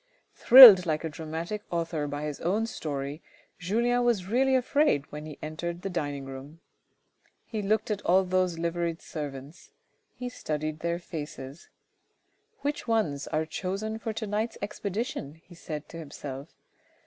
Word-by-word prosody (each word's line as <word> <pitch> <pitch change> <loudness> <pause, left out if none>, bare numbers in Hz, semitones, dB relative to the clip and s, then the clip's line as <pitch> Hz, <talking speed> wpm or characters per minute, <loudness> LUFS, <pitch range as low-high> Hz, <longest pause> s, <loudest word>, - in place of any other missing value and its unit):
Thrilled 225 -9 +10
like 155 0 -1
a 160 - -2
dramatic 160 +6 -5
author 165 -3 -2
by 145 +1 -4
his 150 -2 -4
own 200 +6 0
story, 145 - -5 0.4
Julien 235 +7 +1
was 230 -7 +1
really 260 +6 +2
afraid 260 - +2
when 150 +1 -7
he 150 - -9
entered 170 +3 -5
the 195 - -3
dining 145 -5 -3
room. 135 +4 -10 0.9
He 220 -2 -4
looked 215 +2 0
at 205 -1 -2
all 185 +2 +3
those 185 -2 0
liveried 170 0 -2
servants 145 0 -8 0.2
— - - -46
he 250 - -5
studied 155 -9 -4
their 170 +1 -1
faces. 155 -4 -8 0.9
"Which 290 -2 -3
ones 170 -11 0
are 155 +1 -1
chosen 200 +6 -4
for 225 - -3
to 220 0 -4
night's 215 +3 -2
expedition?" 200 - -4
he 165 +2 -19
said 155 -3 -7
to 165 - -9
himself. 140 -2 -8
170 Hz, 150 wpm, -28 LUFS, 150-215 Hz, 0.9 s, Thrilled